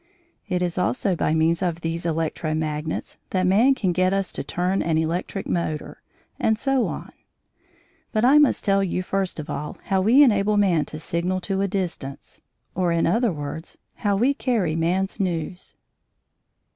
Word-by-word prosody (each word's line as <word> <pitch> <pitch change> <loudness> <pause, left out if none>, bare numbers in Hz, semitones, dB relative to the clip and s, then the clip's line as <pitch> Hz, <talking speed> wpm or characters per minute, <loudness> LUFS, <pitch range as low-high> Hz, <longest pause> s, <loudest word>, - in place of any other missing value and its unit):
It 180 -1 0
is 175 0 -2
also 195 +1 +1
by 160 -1 +1
means 165 +2 +2
of 170 -2 -1
these 165 +1 -3
electro 160 -1 -1
magnets 155 0 -3
that 185 -1 +1
man 225 +9 +4
can 190 -8 0
get 185 +2 +2
us 195 -1 -1
to - - -5
turn 180 +2 -1
an 160 -2 +1
electric 170 +4 -2
motor, 155 -3 -3 0.4
and 220 0 +2
so 270 0 +1
on. - - -6 1.0
But 220 +1 +2
I 280 +4 +7
must 295 - +3
tell 195 -1 +3
you, 185 -1 -1
first 190 -2 -2
of 150 - -5
all, 150 +1 -5
how 190 -1 +1
we 240 +9 +6
enable 210 -4 +3
man 180 -7 +3
to 155 - -8
signal 170 +4 -1
to 195 +1 -1
a 200 - +1
distance, 175 -8 -5 0.3
or, 180 -2 +1
in 170 0 +2
other 230 -1 +2
words, 150 +1 -6 0.2
how 205 -3 +1
we 250 +7 +3
carry 220 - 0
man's 180 +4 0
news. 180 -1 -3
185 Hz, 170 wpm, -23 LUFS, 165-200 Hz, 1.0 s, I